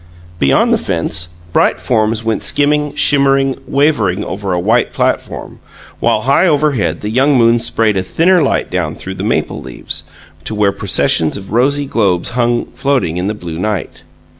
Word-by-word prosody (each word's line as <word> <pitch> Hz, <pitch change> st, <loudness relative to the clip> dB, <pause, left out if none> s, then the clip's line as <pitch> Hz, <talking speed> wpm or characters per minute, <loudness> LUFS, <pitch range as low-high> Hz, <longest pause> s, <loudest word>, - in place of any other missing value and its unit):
Beyond 70 Hz, -1 st, +3 dB
the -, -, +2 dB
fence, 85 Hz, 0 st, -2 dB, 0.2 s
bright -, -, +2 dB
forms 110 Hz, -1 st, 0 dB
went 110 Hz, -2 st, -1 dB
skimming, 150 Hz, 0 st, +1 dB
shimmering, 135 Hz, -1 st, +3 dB
wavering 115 Hz, -, +1 dB
over 100 Hz, -1 st, -4 dB
a 90 Hz, -, 0 dB
white 110 Hz, +7 st, +1 dB
platform, -, -, -2 dB, 0.4 s
while 110 Hz, -, +1 dB
high 140 Hz, +9 st, +3 dB
overhead 140 Hz, -, +1 dB
the 105 Hz, -, -4 dB
young 135 Hz, +4 st, +3 dB
moon 115 Hz, 0 st, +4 dB
sprayed 110 Hz, -2 st, 0 dB
a -, -, +1 dB
thinner 170 Hz, -, +2 dB
light 140 Hz, -, 0 dB
down -, -, -2 dB
through -, -, -7 dB
the -, -, -6 dB
maple -, -, -1 dB
leaves, -, -, -6 dB, 0.4 s
to 110 Hz, -, -3 dB
where 105 Hz, -1 st, +2 dB
processions 90 Hz, -4 st, +1 dB
of 95 Hz, -1 st, -10 dB
rosy 140 Hz, +4 st, +2 dB
globes 100 Hz, -9 st, 0 dB
hung 120 Hz, 0 st, 0 dB
floating 130 Hz, -, -1 dB
in 90 Hz, +2 st, -2 dB
the 105 Hz, -, -2 dB
blue 85 Hz, -5 st, -7 dB
night. 105 Hz, -2 st, -3 dB
115 Hz, 165 wpm, -14 LUFS, 95-140 Hz, 0.4 s, moon